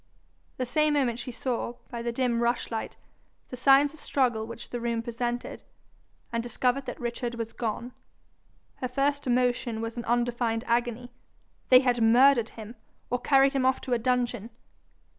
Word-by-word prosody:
The 255 Hz, -, -1 dB
same 305 Hz, +4 st, +2 dB
moment 245 Hz, -5 st, +1 dB
she 260 Hz, -, -5 dB
saw, 240 Hz, -1 st, -3 dB, 0.2 s
by 235 Hz, -1 st, -4 dB
the 235 Hz, 0 st, -2 dB
dim 235 Hz, -1 st, 0 dB
rushlight, 235 Hz, -1 st, -1 dB, 0.5 s
the -, -, -6 dB
signs 275 Hz, +3 st, +5 dB
of 315 Hz, -, -15 dB
struggle 240 Hz, -7 st, 0 dB
which 230 Hz, -, -9 dB
the 245 Hz, -, -3 dB
room 230 Hz, -1 st, -2 dB
presented, 240 Hz, +1 st, -4 dB, 0.7 s
and 230 Hz, -, 0 dB
discovered 250 Hz, +3 st, -1 dB
that 245 Hz, -, -5 dB
Richard 240 Hz, 0 st, -3 dB
was 230 Hz, -1 st, -5 dB
gone. 235 Hz, +2 st, -3 dB, 0.9 s
Her 255 Hz, -, -3 dB
first 280 Hz, +2 st, 0 dB
emotion 245 Hz, -2 st, +1 dB
was 225 Hz, +1 st, -5 dB
an 235 Hz, -, -4 dB
undefined 235 Hz, -1 st, 0 dB
agony: 240 Hz, +1 st, -1 dB, 0.6 s
they 255 Hz, 0 st, +8 dB
had 245 Hz, -3 st, +1 dB
murdered 240 Hz, +1 st, +5 dB
him, 220 Hz, +1 st, -9 dB, 0.3 s
or 245 Hz, -, +1 dB
carried 275 Hz, +1 st, +4 dB
him 270 Hz, -2 st, +1 dB
off 260 Hz, 0 st, +2 dB
to 255 Hz, -, -2 dB
a 240 Hz, -, +2 dB
dungeon! 245 Hz, -2 st, 0 dB
245 Hz, 160 wpm, -27 LUFS, 235-255 Hz, 0.9 s, they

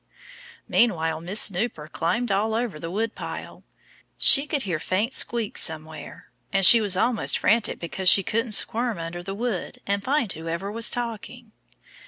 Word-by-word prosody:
Meanwhile 165 Hz, -8 st, 0 dB
Miss 185 Hz, +6 st, -1 dB
Snooper 185 Hz, -5 st, 0 dB
climbed 185 Hz, +10 st, -3 dB
all 215 Hz, +3 st, -1 dB
over 230 Hz, -9 st, -4 dB
the 165 Hz, -, -7 dB
woodpile. 220 Hz, +5 st, -6 dB, 0.5 s
She 280 Hz, +1 st, +7 dB
could 295 Hz, -3 st, -2 dB
hear 175 Hz, -6 st, -3 dB
faint 205 Hz, +10 st, -2 dB
squeaks 230 Hz, -3 st, +1 dB
somewhere. 160 Hz, -1 st, -4 dB, 0.2 s
And 195 Hz, -1 st, +2 dB
she 230 Hz, +4 st, +9 dB
was 200 Hz, -3 st, +2 dB
almost 235 Hz, +2 st, 0 dB
frantic 225 Hz, +1 st, 0 dB
because 180 Hz, +2 st, -1 dB
she 195 Hz, -, +4 dB
couldn't 230 Hz, +3 st, -2 dB
squirm 230 Hz, +1 st, +1 dB
under 165 Hz, +1 st, -7 dB
the 195 Hz, +2 st, -7 dB
wood 225 Hz, -4 st, -5 dB
and 200 Hz, 0 st, -2 dB
find 260 Hz, -5 st, -1 dB
whoever 170 Hz, +5 st, -6 dB
was 230 Hz, +1 st, +3 dB
talking. 235 Hz, 0 st, -7 dB
205 Hz, 155 wpm, -23 LUFS, 175-230 Hz, 0.5 s, she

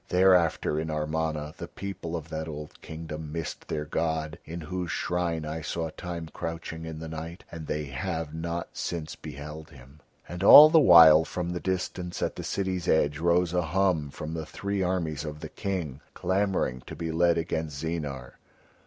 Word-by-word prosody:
Thereafter 90 Hz, -4 st, +3 dB
in 80 Hz, 0 st, -3 dB
Amarna 75 Hz, 0 st, -2 dB
the -, -, -6 dB
people 95 Hz, -4 st, -6 dB
of 80 Hz, -1 st, -6 dB
that 80 Hz, 0 st, -4 dB
old 75 Hz, -1 st, -8 dB
Kingdom 80 Hz, -1 st, -7 dB
missed 80 Hz, 0 st, -5 dB
their 75 Hz, -1 st, -2 dB
god, 80 Hz, +1 st, -2 dB
in 85 Hz, +2 st, -6 dB
whose 90 Hz, +2 st, -4 dB
shrine 85 Hz, -3 st, -1 dB
I 80 Hz, +1 st, -4 dB
saw 80 Hz, +1 st, -3 dB
Time 85 Hz, -1 st, -6 dB
crouching 80 Hz, 0 st, -5 dB
in 80 Hz, -1 st, -6 dB
the 80 Hz, +1 st, -6 dB
night, 80 Hz, +2 st, -7 dB
and 80 Hz, -2 st, -7 dB
they 75 Hz, -, -2 dB
have 75 Hz, +3 st, -4 dB
not 85 Hz, +1 st, -4 dB
since 80 Hz, -3 st, -4 dB
beheld 75 Hz, +2 st, -8 dB
him." 70 Hz, +3 st, -16 dB, 0.3 s
And 90 Hz, +2 st, -5 dB
all 150 Hz, +9 st, +11 dB
the 165 Hz, -, +7 dB
while 80 Hz, -, +9 dB
from 85 Hz, +1 st, -4 dB
the 90 Hz, -, -3 dB
distance 90 Hz, -1 st, -3 dB
at -, -, -1 dB
the -, -, -6 dB
city's 95 Hz, -2 st, -2 dB
edge 75 Hz, -1 st, +2 dB
rose 85 Hz, +1 st, +2 dB
a 90 Hz, -, +2 dB
hum 85 Hz, -3 st, +1 dB
from 75 Hz, +3 st, -6 dB
the 80 Hz, -1 st, -4 dB
three 100 Hz, -1 st, -3 dB
armies 85 Hz, -5 st, -1 dB
of 75 Hz, -1 st, -6 dB
the -, -, -7 dB
King 85 Hz, -9 st, -4 dB
clamouring 95 Hz, -10 st, 0 dB
to -, -, -7 dB
be 85 Hz, -1 st, -3 dB
led 85 Hz, +1 st, +3 dB
against 80 Hz, -3 st, -2 dB
Zeenar. 70 Hz, -7 st, -4 dB
80 Hz, 180 wpm, -28 LUFS, 75-90 Hz, 0.3 s, all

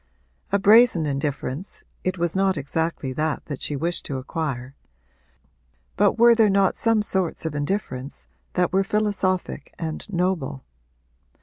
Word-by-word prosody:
A -, -, +4 dB
brazen 210 Hz, -4 st, +6 dB
indifference 140 Hz, +3 st, -3 dB, 0.2 s
it 185 Hz, 0 st, -1 dB
was 170 Hz, 0 st, -1 dB
not 190 Hz, -2 st, +2 dB
exactly 145 Hz, -1 st, -2 dB
that 155 Hz, +2 st, -2 dB
that 145 Hz, -3 st, -6 dB
she 145 Hz, -, -1 dB
wished 170 Hz, +5 st, -1 dB
to 135 Hz, -, -3 dB
acquire; 130 Hz, -2 st, -4 dB, 1.2 s
but -, -, +3 dB
were 235 Hz, +1 st, +7 dB
there 225 Hz, -2 st, +4 dB
not 195 Hz, -1 st, +3 dB
some 225 Hz, -2 st, +2 dB
sorts 190 Hz, -5 st, -1 dB
of 160 Hz, -, -2 dB
indifference 145 Hz, -3 st, -3 dB, 0.3 s
that 180 Hz, -1 st, +1 dB
were 195 Hz, +1 st, +3 dB
philosophic 195 Hz, -3 st, -1 dB
and 160 Hz, +4 st, -5 dB
noble? 175 Hz, -7 st, -1 dB
170 Hz, 135 wpm, -24 LUFS, 145-195 Hz, 1.2 s, were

